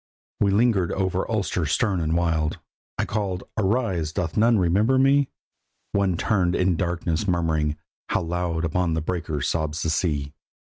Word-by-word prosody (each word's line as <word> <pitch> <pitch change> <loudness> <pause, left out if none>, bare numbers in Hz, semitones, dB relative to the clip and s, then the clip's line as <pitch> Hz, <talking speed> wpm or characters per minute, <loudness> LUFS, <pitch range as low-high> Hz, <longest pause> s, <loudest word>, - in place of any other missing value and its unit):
We 100 - +3
lingered 100 -3 +2
over 95 -1 -1
Ulster 100 -7 -1
stern 100 - +1
and 80 +1 +1
wild. 80 -3 0 0.4
I - - 0
called: 100 -4 -2
"Arise! 95 -6 0
doth 80 0 -3
none 115 +1 +4
remember 100 +8 +3
me?" 135 +1 +4 0.6
One 95 -3 +1
turnèd 90 -4 +1
in 90 +1 +2
the 85 - 0
darkness 85 0 -1
murmuring, 80 -4 0 0.3
"How - - 0
loud 85 -1 -1
upon 85 0 0
the 80 - -1
breakers 80 -4 -2
sobs 80 -1 -1
the 80 - 0
sea!" 75 -4 -1
90 Hz, 155 wpm, -24 LUFS, 80-100 Hz, 0.6 s, none